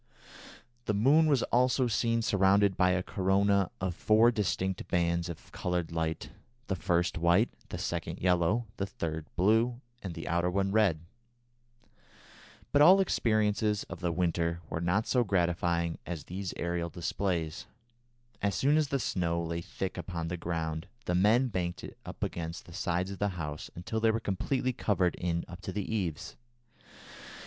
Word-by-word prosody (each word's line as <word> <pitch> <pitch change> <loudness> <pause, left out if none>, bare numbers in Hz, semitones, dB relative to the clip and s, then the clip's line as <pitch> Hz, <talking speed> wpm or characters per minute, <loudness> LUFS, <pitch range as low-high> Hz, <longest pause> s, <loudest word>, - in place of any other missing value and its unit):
The 105 - 0
moon 145 +10 +5
was 140 -5 +3
also 125 +1 +3
seen 115 0 +1
surrounded 100 -1 +3
by 90 - +3
a 90 0 +1
corona 100 -1 +2
of 95 -1 -1
four 110 +6 +4
distinct 95 -4 -1
bands 85 0 0
of 85 - -9
coloured 90 -2 -2
light, 80 -1 -2 0.3
the 95 - -1
first 90 -1 0
white, 85 +7 +3 0.2
the - - -5
second - - -3
yellow, 90 +5 +2
the 100 - -2
third 80 -4 -4
blue, 115 +6 +3 0.2
and 90 -4 -6
the 80 - -6
outer 85 +2 +1
one 95 +1 0
red. 100 -7 +3 1.7
But 145 - +4
all 175 +6 +9
the 195 - +4
experiences 105 - +1
of 85 - -6
the 85 -1 -1
winter 85 -1 0
were 80 - -2
not 90 +6 +1
so 125 -2 +2
gratifying 85 -3 0
as 85 -4 -5
these 95 +3 -5
aerial 85 0 -2
displays. 85 -2 -2 0.7
As 100 -1 0
soon 145 +3 +3
as 155 -2 +2
the 140 - 0
snow 85 -8 -1
lay 85 0 -3
thick 95 +2 -5 0.2
on 85 -1 -2
the 90 - -2
ground 80 -2 -3 0.2
the 90 - 0
men 110 +8 +4
banked 90 -3 -3
it - - -8
up - - -6
against 85 +2 -4
the 85 - -13
sides 90 +1 -1
of 100 - -7
the 105 - +1
house 75 -2 -5
until 90 +6 -3
they 115 0 +3
were 110 +1 +1
completely 125 +6 -1
covered 95 -6 +1
in 85 -1 -2
up 90 +1 -10
to 95 - -5
the 100 +1 -3
eaves. 90 -8 -3
90 Hz, 165 wpm, -30 LUFS, 85-105 Hz, 1.7 s, all